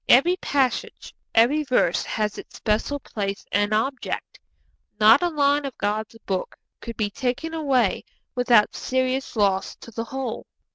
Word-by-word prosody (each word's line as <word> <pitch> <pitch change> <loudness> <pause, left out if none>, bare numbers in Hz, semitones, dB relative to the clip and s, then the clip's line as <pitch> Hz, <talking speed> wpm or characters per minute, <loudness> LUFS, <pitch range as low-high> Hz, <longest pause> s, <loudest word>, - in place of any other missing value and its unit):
Every 335 +9 +6
passage, 265 -7 -1 0.2
every 245 +7 +5
verse 250 - +2
has 210 -1 -2
its - - -12
special 220 +7 -1
place 200 -6 -4
and 205 +1 +1
object. 250 +5 -2 0.6
Not 220 +6 +7
a 350 - +2
line 290 -2 +2
of 275 -3 -6
God's 215 +2 -2
Book 190 -2 -3 0.2
could 230 - -8
be 210 -2 -1
taken 260 +8 -2
away 270 -9 +1 0.3
without 245 -4 +3
serious 260 0 -1
loss 195 -3 +1
to 230 - -13
the 230 +1 -4
whole. 265 -2 -5
245 Hz, 145 wpm, -24 LUFS, 210-270 Hz, 0.6 s, Not